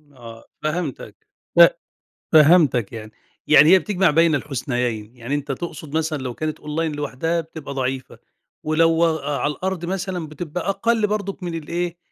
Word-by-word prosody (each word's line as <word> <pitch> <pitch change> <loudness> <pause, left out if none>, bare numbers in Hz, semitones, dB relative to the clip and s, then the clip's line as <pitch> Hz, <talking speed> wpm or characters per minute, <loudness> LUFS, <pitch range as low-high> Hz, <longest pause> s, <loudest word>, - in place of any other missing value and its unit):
آه، 115 -2 -12 0.2
فهمتك، 155 -3 -4 0.3
ف - - +9 0.7
فهمتك 150 - +5
يعني، 110 -1 -8 0.4
يعني 155 0 +7
هي 190 +1 +7
بتجْمَع 185 0 +1
بَين 165 0 +4
الحُسنَيَين، 125 -5 -3
يعني 125 +4 -4
أنت 145 -1 -3
تقصد 155 0 -6
مثلًا 160 -1 -1
لو 125 -2 -4
كانت 155 +3 -4
Online 150 0 -2
لوحدها 160 +4 -2
بتبقى 160 -3 -9
ضعيفة، 130 -1 -4 0.4
ولو 165 +2 +3
أ 160 -3 -1
على 145 - 0
الأرض 185 -1 -3
مثلًا 185 -3 -3
بتبقى 165 +3 -5
أقل 225 +2 +1
برضه 200 -2 -3
من 175 -2 -4
الإيه، 170 +2 -3
155 Hz, 150 wpm, -21 LUFS, 140-175 Hz, 0.7 s, ف